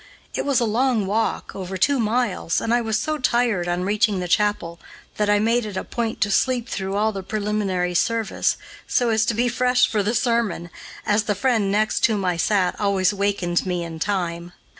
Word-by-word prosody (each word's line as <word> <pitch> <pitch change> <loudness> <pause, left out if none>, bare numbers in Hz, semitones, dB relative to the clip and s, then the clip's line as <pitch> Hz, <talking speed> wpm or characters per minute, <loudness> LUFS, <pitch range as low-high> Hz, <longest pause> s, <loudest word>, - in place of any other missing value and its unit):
It - - -2
was 280 -3 +2
a 240 - +1
long 230 -1 +1
walk, 215 +4 -1
over 190 0 -5
two 275 +8 +2
miles, 225 -6 0
and 230 - -1
I 240 - +3
was 220 -2 0
so 310 -1 -2
tired, 235 -8 +1
on 175 +1 -1
reaching 210 0 +1
the 180 - -3
chapel, 175 -3 0 0.4
that 210 -1 +1
I 205 - +4
made 230 +3 +2
it 210 -3 -6
a - - -2
point 230 -2 -3
to 205 - +2
sleep 250 +1 +1
through 190 0 -3
all 215 +2 +2
the 195 -2 -5
preliminary 200 -3 -1
service, 225 +4 0 0.3
so 245 -1 +1
as 220 0 +2
to 230 - +1
be 240 +2 +1
fresh 250 +1 +2
for 215 - 0
the 210 +4 -1
sermon, 230 -8 0 0.3
as 210 +1 +2
the 205 - 0
friend 220 -3 +1
next 215 +1 +1
whom 210 -4 -1
I 180 -1 +1
sat 185 +1 +1
always 200 -1 +2
wakened 200 -3 0
me 180 -1 -1
in 165 -1 -7
time. 175 -2 -2
210 Hz, 205 wpm, -22 LUFS, 190-230 Hz, 0.4 s, I